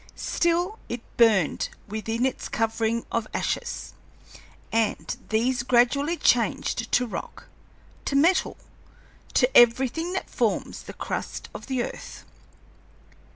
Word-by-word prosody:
Still 350 Hz, +5 st, 0 dB
it 240 Hz, 0 st, -4 dB
burned 215 Hz, -8 st, +3 dB, 0.2 s
within 225 Hz, +3 st, -2 dB
its 265 Hz, -, -2 dB
covering 225 Hz, +1 st, 0 dB
of 230 Hz, -2 st, -1 dB
ashes, -, -, -3 dB, 0.8 s
and 225 Hz, -1 st, 0 dB
these 240 Hz, +3 st, +1 dB
gradually 255 Hz, +7 st, +3 dB
changed 230 Hz, -2 st, +1 dB
to 250 Hz, -, +4 dB
rock, 230 Hz, -, -7 dB, 0.6 s
to 275 Hz, -, -1 dB
metal, 335 Hz, +7 st, +3 dB, 0.8 s
to 255 Hz, 0 st, +3 dB
everything 265 Hz, +8 st, +4 dB
that 380 Hz, -, -3 dB
forms -, -, -1 dB
the -, -, -9 dB
crust -, -, -5 dB
of -, -, -9 dB
the 260 Hz, -3 st, 0 dB
earth." -, -, -8 dB
240 Hz, 110 wpm, -26 LUFS, 225-280 Hz, 0.8 s, to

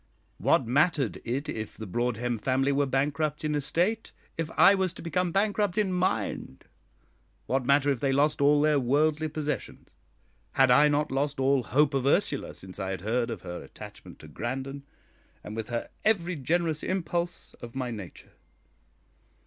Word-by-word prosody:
What -, -, +3 dB
mattered 140 Hz, -, +1 dB
it 130 Hz, +5 st, -3 dB
if 110 Hz, -1 st, -5 dB
the 110 Hz, -, -6 dB
Broadhem 120 Hz, +3 st, -1 dB
family 135 Hz, +3 st, +1 dB
were 140 Hz, 0 st, +1 dB
bankrupt 145 Hz, +3 st, -1 dB
in 150 Hz, -, 0 dB
estate, 175 Hz, +10 st, 0 dB, 0.2 s
if 165 Hz, -1 st, -3 dB
I 200 Hz, -, +8 dB
was 190 Hz, -3 st, 0 dB
to -, -, -9 dB
become 175 Hz, +2 st, 0 dB
bankrupt 205 Hz, 0 st, +1 dB
in 200 Hz, -3 st, +1 dB
mind? 115 Hz, -, -2 dB, 0.8 s
What 130 Hz, -1 st, -1 dB
matter 140 Hz, 0 st, +4 dB
if 135 Hz, -, -1 dB
they 135 Hz, +1 st, +1 dB
lost 145 Hz, +2 st, +2 dB
all 145 Hz, +1 st, +5 dB
their 150 Hz, -1 st, +3 dB
worldly 150 Hz, +5 st, +2 dB
possessions? 150 Hz, -4 st, -4 dB, 0.7 s
Had 135 Hz, -2 st, +4 dB
I 150 Hz, +4 st, +6 dB
not 150 Hz, 0 st, +1 dB
lost 140 Hz, +1 st, -1 dB
all 135 Hz, 0 st, +3 dB
hope 140 Hz, +4 st, +2 dB
of 135 Hz, -1 st, 0 dB
Ursula 150 Hz, -2 st, +1 dB
since 95 Hz, -1 st, -11 dB
I 95 Hz, -, -3 dB
had 95 Hz, -2 st, -4 dB
heard 115 Hz, +4 st, 0 dB
of 110 Hz, -6 st, -6 dB
her 90 Hz, 0 st, -6 dB
attachment -, -, -12 dB
to -, -, -11 dB
Grandon, 135 Hz, +4 st, -5 dB, 0.6 s
and 105 Hz, -, -7 dB
with 115 Hz, -1 st, -5 dB
her 120 Hz, -1 st, -3 dB
every 180 Hz, -5 st, +1 dB
generous 160 Hz, +2 st, 0 dB
impulse 175 Hz, -1 st, -3 dB
of 120 Hz, 0 st, -9 dB
my 130 Hz, -2 st, -2 dB
nature? 100 Hz, -6 st, -9 dB
140 Hz, 165 wpm, -28 LUFS, 125-160 Hz, 0.8 s, I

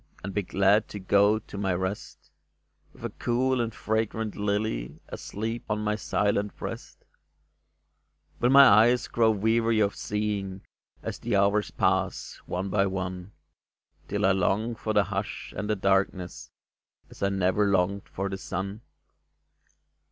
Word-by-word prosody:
And 100 Hz, +1 st, -5 dB
be 105 Hz, -, +1 dB
glad 100 Hz, +3 st, +2 dB
to 105 Hz, -, -7 dB
go 100 Hz, +2 st, +4 dB
to 105 Hz, -1 st, -9 dB
my 95 Hz, -3 st, 0 dB
rest, 95 Hz, +3 st, -5 dB, 0.6 s
With -, -, -10 dB
a -, -, -3 dB
cool 125 Hz, +1 st, 0 dB
and 115 Hz, -1 st, -2 dB
fragrant 110 Hz, 0 st, -2 dB
lily 100 Hz, -, -2 dB
Asleep 115 Hz, +3 st, -5 dB
on 105 Hz, 0 st, -1 dB
my 105 Hz, 0 st, 0 dB
silent 105 Hz, -1 st, -1 dB
breast? -, -, -8 dB, 1.3 s
Will 120 Hz, -, +3 dB
my 140 Hz, +1 st, +9 dB
eyes 120 Hz, +3 st, +5 dB
grow 115 Hz, -1 st, +3 dB
weary 110 Hz, +2 st, +2 dB
of 100 Hz, -2 st, +2 dB
seeing, 100 Hz, -2 st, -3 dB, 0.4 s
As -, -, -5 dB
the -, -, -1 dB
hours 100 Hz, +1 st, +2 dB
pass, -, -, -1 dB
one 95 Hz, +2 st, -3 dB
by 100 Hz, 0 st, +2 dB
one, 95 Hz, 0 st, -4 dB, 0.7 s
Till -, -, 0 dB
I 95 Hz, -, +5 dB
long 100 Hz, +5 st, +1 dB
for 110 Hz, -1 st, -4 dB
the 105 Hz, -1 st, +4 dB
hush 100 Hz, +2 st, -5 dB
and 105 Hz, -, -4 dB
the 105 Hz, -, +2 dB
darkness 95 Hz, -2 st, 0 dB, 0.6 s
As -, -, -14 dB
I 100 Hz, -, +2 dB
never 95 Hz, +1 st, +2 dB
longed 100 Hz, +1 st, 0 dB
for 95 Hz, +1 st, -3 dB
the 95 Hz, -1 st, -5 dB
sun 100 Hz, +4 st, -4 dB
100 Hz, 145 wpm, -27 LUFS, 95-110 Hz, 1.3 s, my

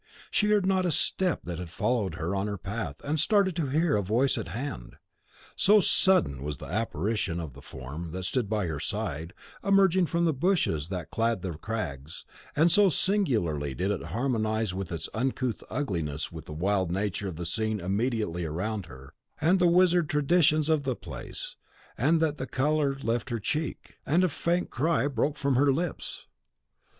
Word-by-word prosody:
She 210 Hz, -, +2 dB
heard 210 Hz, -2 st, +3 dB
not 190 Hz, -1 st, +2 dB
a 180 Hz, -, +1 dB
step 180 Hz, +2 st, +1 dB
that 85 Hz, -1 st, -5 dB
had 90 Hz, -2 st, -6 dB
followed 105 Hz, +2 st, -1 dB
her 85 Hz, +4 st, -2 dB
on 100 Hz, +1 st, -1 dB
her 100 Hz, -1 st, -3 dB
path 100 Hz, +4 st, -4 dB
and 150 Hz, +2 st, -1 dB
started 200 Hz, 0 st, +3 dB
to 160 Hz, -4 st, 0 dB
hear 155 Hz, +3 st, +2 dB
a 105 Hz, -, +2 dB
voice 115 Hz, +8 st, +2 dB
at -, -, -4 dB
hand. 120 Hz, -, -5 dB, 0.6 s
So 210 Hz, +2 st, +5 dB
sudden 180 Hz, -, +3 dB
was 75 Hz, 0 st, -4 dB
the -, -, -9 dB
apparition 100 Hz, -2 st, -1 dB
of 80 Hz, -5 st, -6 dB
the -, -, -13 dB
form 70 Hz, +6 st, -7 dB
that 95 Hz, +2 st, -5 dB
stood 110 Hz, +2 st, -1 dB
by 105 Hz, -3 st, 0 dB
her 80 Hz, -4 st, -3 dB
side, 80 Hz, +4 st, -3 dB, 0.3 s
emerging 190 Hz, -3 st, +4 dB
from 170 Hz, +1 st, +1 dB
the 160 Hz, -, +2 dB
bushes 135 Hz, -, +1 dB
that 90 Hz, -4 st, -5 dB
clad 115 Hz, -4 st, 0 dB
the 95 Hz, -, -2 dB
crags, 80 Hz, -5 st, -5 dB, 0.3 s
and 165 Hz, +3 st, +4 dB
so 205 Hz, 0 st, +6 dB
singularly 110 Hz, -, +1 dB
did 95 Hz, +3 st, 0 dB
it 100 Hz, -, -3 dB
harmonise 110 Hz, +1 st, 0 dB
in 95 Hz, +2 st, -3 dB
its 85 Hz, -3 st, -4 dB
uncouth 125 Hz, -1 st, -1 dB
ugliness 80 Hz, -, -2 dB
with 80 Hz, -2 st, -9 dB
the -, -, -10 dB
wild 95 Hz, +2 st, 0 dB
nature 100 Hz, +1 st, -1 dB
of 90 Hz, -, -5 dB
the 85 Hz, +2 st, -5 dB
scene 110 Hz, +4 st, -1 dB
immediately 100 Hz, -1 st, -1 dB
around 95 Hz, +4 st, -3 dB
her, 65 Hz, -1 st, -13 dB, 0.3 s
and 180 Hz, +5 st, +3 dB
the 180 Hz, -, +5 dB
wizard 175 Hz, -2 st, +4 dB
traditions 155 Hz, 0 st, +3 dB
of 155 Hz, -2 st, +3 dB
the 130 Hz, -3 st, -1 dB
place, -, -, -8 dB, 0.4 s
that 155 Hz, +3 st, +2 dB
the 130 Hz, -, -3 dB
colour 145 Hz, 0 st, +1 dB
left 115 Hz, +2 st, -1 dB
her 120 Hz, -2 st, -2 dB
cheek, 155 Hz, +9 st, -3 dB
and 170 Hz, +5 st, +2 dB
a 185 Hz, -, +3 dB
faint 170 Hz, +4 st, -1 dB
cry 155 Hz, +3 st, +1 dB
broke 145 Hz, +1 st, 0 dB
from 140 Hz, -1 st, +1 dB
her 140 Hz, +2 st, +4 dB
lips. 165 Hz, +4 st, -3 dB
115 Hz, 180 wpm, -28 LUFS, -, 0.6 s, so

